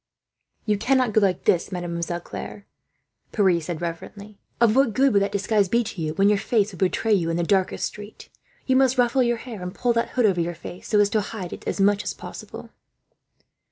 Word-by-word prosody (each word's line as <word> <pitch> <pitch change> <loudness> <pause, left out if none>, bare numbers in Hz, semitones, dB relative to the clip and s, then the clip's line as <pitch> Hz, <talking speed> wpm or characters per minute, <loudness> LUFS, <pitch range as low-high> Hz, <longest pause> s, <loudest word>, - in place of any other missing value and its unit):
"You 210 -2 0
cannot 255 0 +2
go 215 - +4
like 185 -3 +1
this, 175 +2 +1
Mademoiselle 175 -1 -3
Claire," 200 +3 -8 0.7
Pierre 185 -5 +2
said 170 +1 -5
reverently. 200 +5 -7 0.2
"Of 230 -1 +4
what 270 -4 +3
good 270 -1 +3
would 200 - +4
that 200 - 0
disguise 200 -1 +1
be 235 +3 +2
to 195 -5 -7
you, 155 -1 -3
when 195 +1 +3
your 205 -1 +3
face 215 -1 +1
would 180 - -12
betray 205 +3 +1
you 170 -5 +1
in 165 - -1
the 175 - 0
darkest 190 +1 +1
street? 210 0 -9 0.4
You 260 - +2
must 265 -1 +3
ruffle 245 +1 +3
your 240 -1 +1
hair, 225 -4 -9
and 180 0 -6
pull 245 -1 +1
that 230 0 0
hood 245 - +4
over 185 -4 +2
your 170 +1 -3
face, 175 +2 -10
so 210 - +2
as 205 -1 +4
to 215 - +2
hide 200 -3 -6
it - - -9
as - - -2
much 205 +1 +3
as - - -4
possible." - - -10
205 Hz, 220 wpm, -24 LUFS, 180-230 Hz, 0.7 s, go